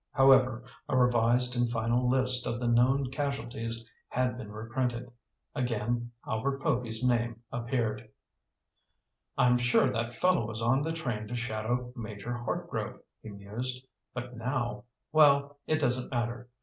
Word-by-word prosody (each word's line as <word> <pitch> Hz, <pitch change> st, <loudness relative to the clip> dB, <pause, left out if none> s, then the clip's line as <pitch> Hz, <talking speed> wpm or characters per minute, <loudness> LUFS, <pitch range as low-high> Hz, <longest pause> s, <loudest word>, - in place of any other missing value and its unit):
However, 130 Hz, -2 st, +5 dB, 0.3 s
a 130 Hz, -, +2 dB
revised 125 Hz, 0 st, +3 dB
and 120 Hz, -1 st, +2 dB
final 120 Hz, +2 st, +1 dB
list 130 Hz, -1 st, +2 dB
of 120 Hz, 0 st, -2 dB
the 120 Hz, -, -1 dB
known 125 Hz, +3 st, +3 dB
casualties 120 Hz, -5 st, -3 dB, 0.2 s
had 125 Hz, -1 st, 0 dB
been 110 Hz, -4 st, -8 dB
reprinted. 120 Hz, +2 st, -3 dB, 0.4 s
Again 120 Hz, -2 st, -1 dB, 0.2 s
Albert 135 Hz, +5 st, -1 dB
Povy's 120 Hz, -1 st, 0 dB
name 120 Hz, -1 st, 0 dB
appeared. 115 Hz, -3 st, -2 dB, 1.3 s
"I'm 125 Hz, 0 st, +4 dB
sure 125 Hz, +2 st, +3 dB
that 115 Hz, 0 st, -2 dB
fellow 180 Hz, -9 st, +2 dB
was 110 Hz, 0 st, -5 dB
on 120 Hz, +4 st, +3 dB
the 160 Hz, +2 st, -1 dB
train 125 Hz, -10 st, -3 dB
to 125 Hz, -, -4 dB
shadow 120 Hz, +1 st, -2 dB
Major 110 Hz, -1 st, -5 dB
Hartgrove," 120 Hz, 0 st, -3 dB, 0.2 s
he 110 Hz, -, -9 dB
mused. 115 Hz, +6 st, -5 dB, 0.3 s
"But 125 Hz, 0 st, -6 dB
now—well, 140 Hz, +4 st, +1 dB
it 155 Hz, -, +2 dB
doesn't 130 Hz, -4 st, 0 dB
matter. 120 Hz, 0 st, -2 dB
120 Hz, 135 wpm, -30 LUFS, 115-130 Hz, 1.3 s, However